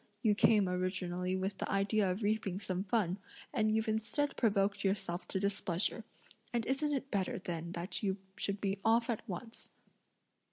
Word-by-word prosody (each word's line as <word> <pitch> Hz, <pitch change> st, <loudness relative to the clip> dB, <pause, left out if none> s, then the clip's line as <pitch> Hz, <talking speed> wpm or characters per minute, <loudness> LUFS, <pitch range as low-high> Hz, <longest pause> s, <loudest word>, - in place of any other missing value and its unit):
You 215 Hz, -3 st, +5 dB
came 205 Hz, -1 st, +5 dB
originally 180 Hz, 0 st, -1 dB
with 190 Hz, +1 st, -2 dB
the -, -, -2 dB
idea 195 Hz, 0 st, +2 dB
of 185 Hz, +4 st, -2 dB
reaping 205 Hz, -3 st, 0 dB
some 185 Hz, -1 st, -2 dB
fun, 195 Hz, -3 st, +1 dB, 0.3 s
and 215 Hz, -4 st, +2 dB
you've 220 Hz, +1 st, +1 dB
instead 220 Hz, +7 st, 0 dB
provoked 200 Hz, -3 st, +2 dB
yourself 190 Hz, -2 st, -1 dB
to 190 Hz, -, -1 dB
displeasure, 200 Hz, +1 st, 0 dB, 0.5 s
and 235 Hz, -2 st, 0 dB
isn't 280 Hz, +3 st, +1 dB
it 275 Hz, -1 st, -2 dB
better 195 Hz, -3 st, 0 dB
then 170 Hz, -1 st, -4 dB
that 175 Hz, +3 st, -3 dB
you 195 Hz, -2 st, 0 dB, 0.2 s
should 200 Hz, 0 st, -1 dB
be 195 Hz, 0 st, -1 dB
off 230 Hz, +2 st, +4 dB
at 225 Hz, -, -2 dB
once." 225 Hz, +6 st, -6 dB
200 Hz, 165 wpm, -34 LUFS, 185-220 Hz, 0.5 s, You